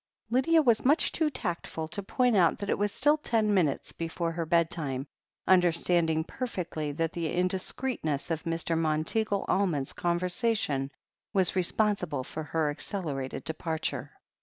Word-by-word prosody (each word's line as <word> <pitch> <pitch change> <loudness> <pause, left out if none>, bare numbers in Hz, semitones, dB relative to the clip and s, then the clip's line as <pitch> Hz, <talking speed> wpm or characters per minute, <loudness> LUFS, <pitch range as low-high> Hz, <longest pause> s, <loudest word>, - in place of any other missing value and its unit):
Lydia 315 +6 +4
was 235 -5 +3
much 295 +5 +4
too 315 -2 +1
tactful 170 - -4
to 200 - -4
point 245 +4 +1
out 175 -4 +4
that 200 - -3
it - - +1
was 205 0 +1
still 295 +7 +3
ten 225 -8 +1
minutes 165 -8 +1
before 165 0 -3
her 165 -1 -3
bedtime, 160 -5 0 0.4
tmderstanding 170 -3 +3
perfectly 175 - -4
that 165 +2 -1
the 165 -2 -3
indiscreetness 180 - -1
of 160 -1 -1
Mr. 165 0 -1
Monteagle 165 +7 0
Almond's 170 -9 +1
conversation 175 - 0 0.4
was 190 -3 +3
responsible 185 -6 +1
for 155 - -6
her 155 0 0
ac 145 - -9
celerated 145 -10 -3
departure. 160 0 -3
175 Hz, 140 wpm, -29 LUFS, 160-205 Hz, 0.4 s, Lydia